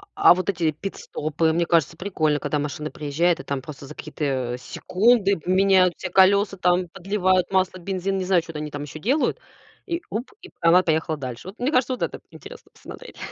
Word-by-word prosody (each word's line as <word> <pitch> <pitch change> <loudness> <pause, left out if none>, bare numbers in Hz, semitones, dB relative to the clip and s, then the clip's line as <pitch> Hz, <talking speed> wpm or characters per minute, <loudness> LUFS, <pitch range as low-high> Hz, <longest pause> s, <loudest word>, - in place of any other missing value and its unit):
А 405 0 +7
вот 185 +2 -3
эти 170 -4 +1
пит-стопы, 155 -2 -2
мне 170 +1 +1
кажется, 165 -1 +1
прикольно, 155 -6 0
когда 150 - -2
машина 150 +1 -4
приезжает 160 +4 0
и - - -14
там 140 -2 -3
просто 140 0 -10
за - - -9
какие-то, 135 -5 -3
секунды 200 - +2
поменяют 185 +1 +3
все 185 - -5
колёса, 195 +2 +4
там, 180 0 +2
подливают 185 0 0
масло, 185 -1 +1
бензин, 195 +1 -2
не 190 - -2
знаю, 185 -2 +3
чё-то 165 -2 -8
они 150 0 -5
там 145 0 -5
ещё 150 +2 -8
делают. 270 - +1 0.5
И 340 -2 -3
уп, 230 +5 -4
и 375 - -12
п - - -35
она 170 +2 +6
поехала 160 -2 0
дальше. 130 +5 -7
Вот, 200 - -13
мне 255 +4 0
кажется, 255 -2 +2
вот 255 - -7
это - - -4
интересно - - -13
посмотреть. - - -12
180 Hz, 200 wpm, -23 LUFS, 155-195 Hz, 0.5 s, А